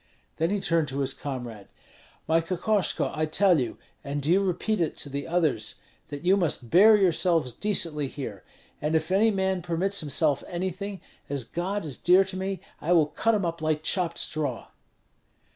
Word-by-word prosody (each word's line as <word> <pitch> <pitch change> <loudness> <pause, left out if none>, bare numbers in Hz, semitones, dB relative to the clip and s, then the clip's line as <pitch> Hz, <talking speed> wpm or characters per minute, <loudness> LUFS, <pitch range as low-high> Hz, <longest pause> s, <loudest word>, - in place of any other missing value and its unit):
Then 165 +1 +1
he 205 +1 0
turned 165 -4 +1
to 135 +1 -3
his 135 0 0
comrade: 120 -7 -7 0.6
"My 165 +1 +3
Kokoshko, 185 +4 0
I 155 0 -1
tell 180 +1 +4
you, 125 -3 -3 0.3
and 145 0 -3
do 145 +3 -1
you 190 +3 +4
repeat 195 +3 -1
it 160 - -1
to 145 - -1
the 140 +2 -4
others, 155 -11 0 0.3
that 145 +2 -8
you 190 +2 +5
must 155 - -1
bear 210 +5 +7
yourselves 170 - +2
decently 165 - +1
here; 120 -9 -7 0.4
and 150 +2 0
if 160 +2 0
any 210 +4 +4
man 190 -2 0
permits 180 +4 0
himself 145 -1 +1
anything, 190 +2 -4 0.3
as 140 -2 -2
God 185 - -3
is 145 -4 -5
dear 180 +2 +5
to 190 0 -7
me, 190 -1 -3 0.2
I 170 +4 +1
will 165 -3 +5
cut 225 +9 0
him 200 -3 0
up 170 -1 -3
like 155 -1 0
chopped 175 -1 0
straw." 145 -6 -2
165 Hz, 180 wpm, -26 LUFS, 145-190 Hz, 0.6 s, bear